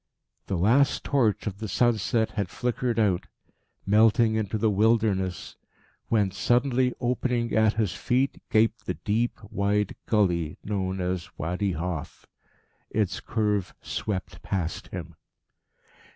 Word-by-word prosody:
The 95 - -1
last 120 +10 +3
torch 120 -7 +1
of 100 -2 -4
the 110 - -4
sunset 115 +1 +1
had 100 -3 -2
flickered 120 +2 -1
out, 100 -5 +1 0.6
melting 110 +2 +4
into 110 -1 -1
the 110 0 +2
wilderness, 105 -4 +1 0.5
when, 105 -4 +2
suddenly 125 +5 +2
opening 120 -1 0
at 110 0 +4
his 105 -5 0
feet, 130 +7 0
gaped 115 +1 +2
the - - -1
deep, 115 +3 -1
wide 100 +1 0
gully 90 -7 +1
known 95 -2 -2
as 90 -1 -2
Wadi 90 +4 -1
Hof. 85 -1 -5 0.6
Its 105 -4 0
curve 105 -4 -1
swept 100 -3 -4
past 90 -4 -3
him. - - -7
105 Hz, 125 wpm, -26 LUFS, 95-115 Hz, 0.6 s, melting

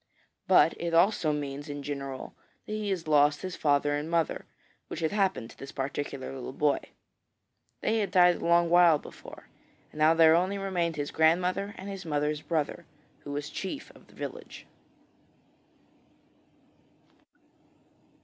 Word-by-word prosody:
But - - +5
it 170 -1 -1
also 170 -3 +3
means 145 0 -4
in 145 0 -6
general 140 -2 -6 0.3
that - - -9
he 215 -1 -2
has 175 -5 -2
lost 145 0 +3
his 185 -2 -4
father 145 -1 +2
and 150 +2 -4
mother, 165 -2 0 0.4
which - - -6
had 160 - 0
happened 190 - 0
to - - -17
this 135 - -8
particular 135 -1 -4
little 130 -1 -7
boy. 145 +1 +2 1.0
They 225 +1 +1
had 205 -3 -1
died 180 -2 +5
a - - -9
long 170 0 +4
while 175 -3 +6
before, - - -12 0.5
and 150 - -11
now 155 +2 +5
there 160 -1 +7
only 185 +4 +1
remained 180 -4 -1
his 145 -1 -3
grandmother 180 +5 +1
and 190 - -8
his 195 -1 -6
mother's 150 -1 -1
brother, 165 +1 -2 0.3
who 145 - -9
was 145 +1 -4
chief 235 +10 -6
of - - -20
the - - -20
village. - - -8
160 Hz, 150 wpm, -28 LUFS, 145-180 Hz, 1.0 s, there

